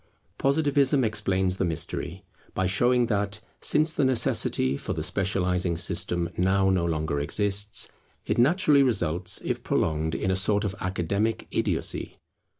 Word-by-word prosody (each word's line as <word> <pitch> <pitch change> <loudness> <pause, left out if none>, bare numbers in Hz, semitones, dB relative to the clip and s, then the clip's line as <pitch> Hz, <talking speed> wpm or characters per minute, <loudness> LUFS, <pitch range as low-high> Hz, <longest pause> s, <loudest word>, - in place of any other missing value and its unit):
Positivism 140 -1 +2
explains 95 -4 0
the - - 0
mystery, 80 -3 -4 0.3
by 95 - 0
showing 120 +6 +2
that, 105 -2 -2 0.2
since 155 +1 +2
the 145 - 0
necessity 115 - +1
for - - -4
the - - -4
specializing 90 -2 0
system 85 0 0
now 95 +1 +2
no 90 -2 +1
longer 80 -3 -1
exists, 100 +7 -1 0.4
it - - -1
naturally 150 +2 +4
results 90 - +1
if - - -2
prolonged, 80 +1 -1
in 95 - -1
a - - +1
sort 100 +2 +1
of 100 -3 -2
academic 95 +4 -1
idiocy. - - -1
95 Hz, 140 wpm, -26 LUFS, 90-120 Hz, 0.4 s, naturally